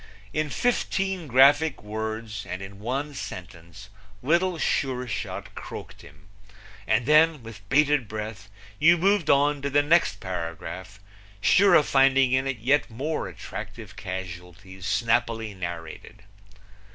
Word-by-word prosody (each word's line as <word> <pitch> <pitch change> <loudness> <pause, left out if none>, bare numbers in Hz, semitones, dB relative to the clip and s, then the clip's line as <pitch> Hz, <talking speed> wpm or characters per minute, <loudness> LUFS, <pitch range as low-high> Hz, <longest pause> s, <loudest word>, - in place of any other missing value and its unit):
In 155 -1 -1
fifteen 195 - -1
graphic 140 +3 +4
words 110 0 -5
and 95 +1 -5
in 100 0 -10
one 135 +7 -3
sentence 90 - -9 0.3
Little 170 +5 +2
Sure 130 -5 -1
Shot 110 - -5
croaked - - -9
him, 75 +3 -17 0.6
and 115 +2 +2
then 155 -1 +4
with 115 -2 -10
bated 145 -3 +3
breath 105 -1 -6 0.3
you 170 +3 +6
moved 195 -1 +2
on 145 +1 +3
to 140 - -2
the 145 +1 +3
next 165 +4 +3
paragraph, 90 +2 -6 0.4
sure 195 - +5
of 150 - +5
finding 135 -1 +4
in 130 +1 +1
it 135 -2 -2
yet 135 +7 +1
more 140 +8 -3
attractive - - -9
casualties 90 +1 -8
snappily 115 -2 0
narrated. 85 +3 -8
120 Hz, 125 wpm, -25 LUFS, 100-145 Hz, 0.6 s, you